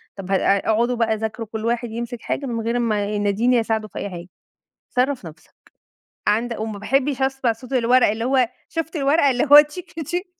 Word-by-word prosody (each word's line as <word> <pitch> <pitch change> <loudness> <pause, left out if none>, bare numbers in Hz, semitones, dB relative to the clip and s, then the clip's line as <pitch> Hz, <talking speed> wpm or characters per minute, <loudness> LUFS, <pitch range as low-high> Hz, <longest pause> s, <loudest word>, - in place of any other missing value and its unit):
طب 195 -1 -7
ه - - +4
اقعدوا 220 +5 +2
بقى 225 -2 +1
ذاكروا 220 +1 -4
كل 220 0 -4
واحد 235 0 -1
يمسك 235 +1 -5
حاجة 280 - -3
من 235 -3 -3
غير 235 +1 0
ما 215 -4 0
يناديني 210 +4 +1
أساعده 220 -1 -1
في - - -8
أي 200 - -4
حاجة، 175 -2 -8 0.6
صرّف 255 -3 0
نفسك، 160 0 -13 0.7
عند 230 +3 +1
وما 220 -1 -5
باحبش 270 +5 0
أسمع 265 -3 +1
صوت 240 +3 -13
الورق 250 0 +4
اللي 220 +2 -2
هو 255 -1 +2 0.2
شُفت 330 0 -4
الورق 285 +2 +2
اللي 260 -3 +3
هو 295 - +12
تشك 300 +5 -7
تشك 355 +6 -3
235 Hz, 190 wpm, -21 LUFS, 215-265 Hz, 0.7 s, هو